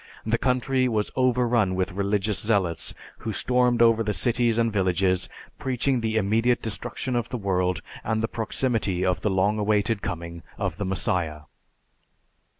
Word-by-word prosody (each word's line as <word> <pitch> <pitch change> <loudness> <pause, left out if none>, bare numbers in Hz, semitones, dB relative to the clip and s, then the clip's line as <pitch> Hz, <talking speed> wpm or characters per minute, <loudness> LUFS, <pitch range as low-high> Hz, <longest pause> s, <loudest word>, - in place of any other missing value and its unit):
The 115 +1 +1
country 130 0 +1
was 110 -3 -1
overrun 120 -6 +2
with 95 +1 -1
religious 100 +1 0
zealots 100 -7 0 0.2
who 110 - -4
stormed 125 +2 +2
over 115 -1 +4
the 105 -2 -1
cities 120 -2 +1
and 115 -2 +1
villages 95 -1 +1 0.3
preaching 130 0 0
the 110 0 0
immediate 115 +4 +2
destruction 120 +3 -2
of 120 -1 -1
the 125 - -3
world 90 -3 0 0.2
and 110 0 -1
the - - +1
proximity 110 -5 -1
of 90 -2 0
the 105 - +1
long 100 +3 +1
awaited 105 0 +1
coming 85 -2 -5 0.2
of 95 -6 -2
the 105 - -3
Messiah. 90 -4 -1
110 Hz, 155 wpm, -25 LUFS, 95-120 Hz, 0.3 s, over